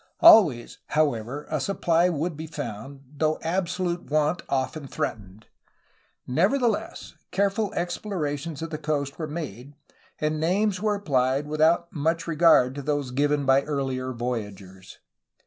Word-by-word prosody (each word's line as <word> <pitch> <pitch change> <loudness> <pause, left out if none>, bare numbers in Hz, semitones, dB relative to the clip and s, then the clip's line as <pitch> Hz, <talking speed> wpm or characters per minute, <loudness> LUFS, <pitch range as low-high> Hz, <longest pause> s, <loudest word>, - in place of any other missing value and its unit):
^' - - -34 0.2
Always, 170 - +6
however, 145 -2 -1
a 155 - 0
supply 175 +1 +2
would 165 0 -2
be 160 +2 -7
found, 135 -2 -7 0.2
though 155 0 +1
absolute 175 0 -2
want 155 +3 +1
often 135 +2 -2
threatened. 105 -4 -5 0.8
Nevertheless, 220 - 0 0.2
careful 200 +1 0
explorations 165 -4 -3
of 165 - -6
the 155 - -4
coast 145 -2 -2
were 155 - -3
made, 145 -4 -7 0.4
and 155 0 -1
names 185 +4 +1
were 210 -1 0
appHed 135 -5 +1
without 160 +3 +2
much 165 +2 0
regard 160 -6 +4
to 140 - -6
those 145 -2 -2
given 145 +2 +1
by 135 +1 +5
earher 135 -3 -3
voyagers. 105 -6 -6
150 Hz, 130 wpm, -25 LUFS, 135-170 Hz, 0.8 s, Always